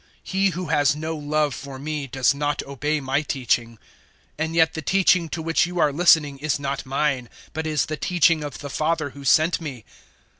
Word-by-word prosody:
014:024 -, -, -32 dB, 0.2 s
He 195 Hz, +1 st, +1 dB
who 180 Hz, +1 st, -4 dB
has 145 Hz, -1 st, +3 dB
no 160 Hz, +2 st, -4 dB
love 150 Hz, -1 st, 0 dB
for 140 Hz, +1 st, -8 dB
me 150 Hz, 0 st, -4 dB
does 130 Hz, +1 st, +2 dB
not 145 Hz, 0 st, -2 dB
obey 145 Hz, +3 st, -2 dB
my 135 Hz, +1 st, 0 dB
teaching; 120 Hz, -5 st, -1 dB, 0.6 s
and 160 Hz, +1 st, -3 dB
yet 160 Hz, -1 st, +4 dB
the 160 Hz, -, -4 dB
teaching 180 Hz, 0 st, +3 dB
to 160 Hz, 0 st, -4 dB
which 165 Hz, +1 st, +2 dB
you 180 Hz, 0 st, -6 dB
are 145 Hz, -, +3 dB
listening 150 Hz, -3 st, +4 dB
is 150 Hz, +1 st, 0 dB
not 140 Hz, -1 st, -4 dB
mine, 135 Hz, -3 st, -1 dB, 0.2 s
but 160 Hz, 0 st, -3 dB
is 155 Hz, -2 st, +1 dB
the 155 Hz, -, -4 dB
teaching 165 Hz, -1 st, +2 dB
of 145 Hz, -2 st, -6 dB
the 145 Hz, -, -7 dB
Father 155 Hz, -1 st, -1 dB
who 140 Hz, +1 st, -11 dB
sent 155 Hz, +6 st, +3 dB
me. 130 Hz, -9 st, -7 dB
150 Hz, 200 wpm, -23 LUFS, 140-160 Hz, 0.6 s, yet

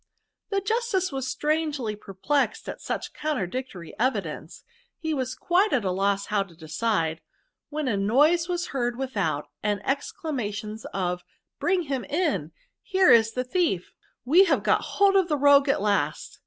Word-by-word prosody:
" -, -, -58 dB
The 395 Hz, -1 st, 0 dB
justice 400 Hz, -4 st, 0 dB
was 265 Hz, -1 st, -3 dB
strangely 295 Hz, -6 st, -1 dB
perplexed 210 Hz, +8 st, -1 dB
at -, -, -6 dB
such -, -, -4 dB
contradictory 250 Hz, -, -4 dB
evidence; 255 Hz, +3 st, -2 dB, 0.3 s
he 320 Hz, -1 st, -2 dB
was 260 Hz, -3 st, -2 dB
quite 375 Hz, +5 st, +2 dB
at 240 Hz, -7 st, +1 dB
a 185 Hz, -, +1 dB
loss 195 Hz, +1 st, 0 dB
how 210 Hz, -1 st, +1 dB
to 190 Hz, -4 st, -8 dB
decide, 160 Hz, 0 st, -1 dB, 0.5 s
when 300 Hz, -1 st, -3 dB
a 215 Hz, -5 st, +1 dB
noise 295 Hz, -, +3 dB
was 350 Hz, 0 st, -2 dB
heard, 245 Hz, -3 st, -1 dB
without, 200 Hz, -, -2 dB
and 205 Hz, -1 st, 0 dB
exclamations 255 Hz, -, -3 dB
of 180 Hz, -2 st, -2 dB, 0.2 s
* -, -, -60 dB
bring 360 Hz, 0 st, +1 dB
him 270 Hz, -5 st, -3 dB
in,' 290 Hz, -, -1 dB
— -, -, -38 dB
* -, -, -61 dB
here 380 Hz, -2 st, +4 dB
's 225 Hz, -1 st, +5 dB
the 250 Hz, -, -1 dB
thief,' 255 Hz, -, -1 dB
— -, -, -38 dB
< -, -, -61 dB
we 340 Hz, +9 st, +6 dB
have 360 Hz, -, +1 dB
got -, -, +3 dB, 0.2 s
hold 400 Hz, -1 st, +5 dB
of 380 Hz, -3 st, +4 dB
the 300 Hz, -3 st, 0 dB
rogue 285 Hz, 0 st, +5 dB
at 240 Hz, -, +1 dB
last.' 205 Hz, -1 st, -1 dB
265 Hz, 180 wpm, -26 LUFS, 205-320 Hz, 0.5 s, we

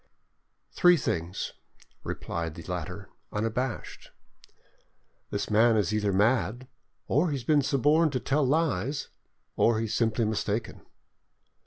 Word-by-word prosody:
"Three 175 Hz, 0 st, +5 dB
things," 85 Hz, -, -3 dB, 0.5 s
replied 80 Hz, -2 st, -4 dB
the -, -, -9 dB
latter, -, -, -6 dB, 0.2 s
unabashed, 115 Hz, +3 st, -3 dB, 1.2 s
"this -, -, -3 dB
man 110 Hz, +1 st, +5 dB
is 105 Hz, -1 st, +1 dB
either 105 Hz, -1 st, +1 dB
mad, 110 Hz, +4 st, +1 dB, 0.4 s
or 155 Hz, +7 st, +2 dB
he 145 Hz, -, -1 dB
has 130 Hz, -, -5 dB
been 150 Hz, +3 st, +3 dB
suborned 145 Hz, +4 st, +3 dB
to 130 Hz, -, 0 dB
tell 145 Hz, +4 st, +1 dB
lies, 140 Hz, -, 0 dB, 0.5 s
or 115 Hz, -1 st, +3 dB
he 115 Hz, -, -1 dB
is 110 Hz, -, -4 dB
simply 115 Hz, 0 st, +1 dB
mistaken." 110 Hz, +1 st, -2 dB
115 Hz, 125 wpm, -28 LUFS, 105-140 Hz, 1.2 s, Three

